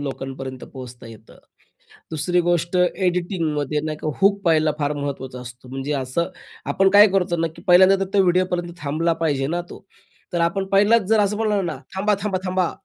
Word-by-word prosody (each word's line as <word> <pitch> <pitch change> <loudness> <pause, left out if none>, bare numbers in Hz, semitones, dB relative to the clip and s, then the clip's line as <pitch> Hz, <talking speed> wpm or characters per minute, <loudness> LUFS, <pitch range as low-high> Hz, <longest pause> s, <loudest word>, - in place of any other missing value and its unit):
लोकांपर्यंत 135 -2 -6
पोहोचता 125 -3 -10
येतं. 110 -1 -14 0.7
दुसरी 175 +3 0
गोष्ट, 175 0 0
एडिटिंगमध्ये 175 -5 0
नाही 155 -1 -3
का, 155 - -1
हूक 200 +1 +3
पहिला 155 -2 +3
फार 145 -1 0
महत्त्वाचा 135 -3 -5
असतो. 125 +1 -11
म्हणजे 135 +3 -4
असं 135 +5 -2 0.4
आपण 195 0 +3
काय 205 +2 +8
करतो 180 -3 +1
ना, 165 0 0
की 170 - -13
पहिल्यांदा 185 +2 +6
तर 190 - -13
तो 195 - +5
व्हिडिओपर्यंत 180 -1 0
थांबला 160 +4 0
पाहिजे 135 -3 0
ना 170 +3 -1
तो. - - -12 0.5
तर 175 - 0
आपण 170 +3 0
पहिलाच 210 +3 +5
जर 220 -1 +4
असं 205 +1 +1
म्हणालो 210 -3 0
ना, 170 - -3 0.2
"थांबा, 205 +2 +1
थांबा, 195 -3 -1
थांबा!" 185 -1 0
170 Hz, 175 wpm, -22 LUFS, 145-190 Hz, 0.7 s, काय